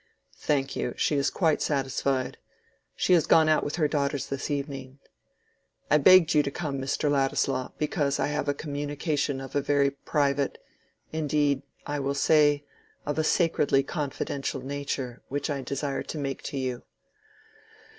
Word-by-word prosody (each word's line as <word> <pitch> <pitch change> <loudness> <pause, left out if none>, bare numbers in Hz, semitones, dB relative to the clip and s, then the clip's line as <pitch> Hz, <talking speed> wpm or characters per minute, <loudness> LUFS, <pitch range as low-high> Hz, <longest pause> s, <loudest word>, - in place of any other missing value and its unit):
"Thank 135 -2 0
you, 125 - -2
she 150 - +1
is 140 0 +2
quite 160 -5 +1
satisfied; 135 -2 -1 0.6
she - - +2
has 170 -3 +4
gone 160 -1 +6
out 155 0 +3
with 145 - -3
her 155 -3 +2
daughters 145 -1 -1
this 135 +2 -4
evening. 140 -2 -4 0.9
I 150 - +6
begged 175 +2 +7
you 150 - +5
to 140 - -2
come, 140 -2 -4
Mr. 140 +3 -1
Ladislaw, 135 -2 0
because 145 -2 0
I - - +2
have 150 0 -1
a 145 - +1
communication 145 -1 -2
of 135 +1 -8
a 145 - +3
very 140 0 +2
private—indeed, 145 +1 -1 0.2
I 145 0 -2
will 140 0 -1
say, 145 0 +4 0.4
of 145 +2 -2
a - - +2
sacredly 155 -4 +2
confidential 140 -2 -3
nature, 135 -3 -4
which 145 +2 -2
I 140 -1 -2
desire 140 +2 -3
to - - -6
make 135 -2 -3
to 140 - -4
you. 130 -2 -2
145 Hz, 155 wpm, -27 LUFS, 135-150 Hz, 0.9 s, begged